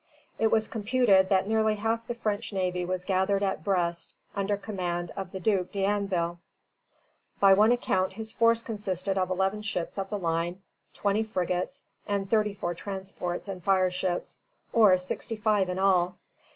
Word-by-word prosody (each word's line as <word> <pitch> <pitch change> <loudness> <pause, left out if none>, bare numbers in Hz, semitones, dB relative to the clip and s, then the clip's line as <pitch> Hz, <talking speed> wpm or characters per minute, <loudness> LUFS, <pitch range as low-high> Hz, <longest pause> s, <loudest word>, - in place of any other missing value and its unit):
It 220 0 +3
was 220 -1 +2
computed 210 -4 +3
that 190 0 +3
nearly 220 0 +2
half 225 +2 -1
the 240 - -3
French 220 -2 -2
navy 180 -2 -1
was 180 0 -3
gathered 195 +1 +1
at 190 -5 -1
Brest 175 -3 -1 0.2
under 200 0 0
command 175 -4 -3
of 190 -2 -5
the 190 - -5
Duc 185 -2 +1
d'Anville. 195 -4 0 1.0
By 195 -1 +7
one 210 +4 +5
account 190 -7 +1
his 220 +2 -6
force 230 0 +3
consisted 195 -3 -3
of 185 -1 0
eleven 190 +3 0
ships 200 -3 -3
of 195 0 -3
the 210 - -2
line, 170 +1 -2 0.3
twenty 205 +1 +1
frigates, 185 +2 -2 0.2
and 200 -2 -1
thirty 210 -1 +1
four 175 -3 -2
transports 190 0 -5
and 185 -3 -6
fireships, 185 -1 0 0.3
or 210 -5 +6
sixty 185 +5 -4
five 210 -3 +1
in 180 - -2
all. 185 -2 +3
195 Hz, 160 wpm, -28 LUFS, 180-210 Hz, 1.0 s, By